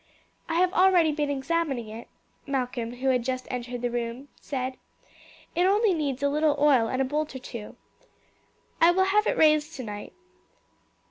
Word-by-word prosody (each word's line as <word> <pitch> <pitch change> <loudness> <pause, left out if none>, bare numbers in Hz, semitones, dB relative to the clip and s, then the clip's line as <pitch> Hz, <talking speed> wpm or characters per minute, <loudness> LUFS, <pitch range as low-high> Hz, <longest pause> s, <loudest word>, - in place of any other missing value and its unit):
"I 325 - -1
have 365 +1 +2
already 365 -4 +4
been 295 -1 -1
examining 280 -3 -1
it," 225 +2 -9 0.4
Malcolm 250 -3 -2
who 265 +2 -1
had 250 -2 +2
just 255 0 -3
entered 245 -1 -5
the 245 - 0
room 240 +3 -4
said. 260 -2 -4 0.8
"It 355 +2 +2
only 410 +1 +3
needs 285 -4 -2
a - - +4
little 300 +1 +2
oil 280 -6 +4
and 255 - -2
a 270 - +2
bolt 300 +2 -2
or - - -2
two. 235 -4 -8 1.1
I 335 - +7
will 375 +2 +3
have 420 +3 +2
it - - 0
raised 305 0 +3
tonight. 210 -5 -7
280 Hz, 170 wpm, -26 LUFS, 250-325 Hz, 1.1 s, I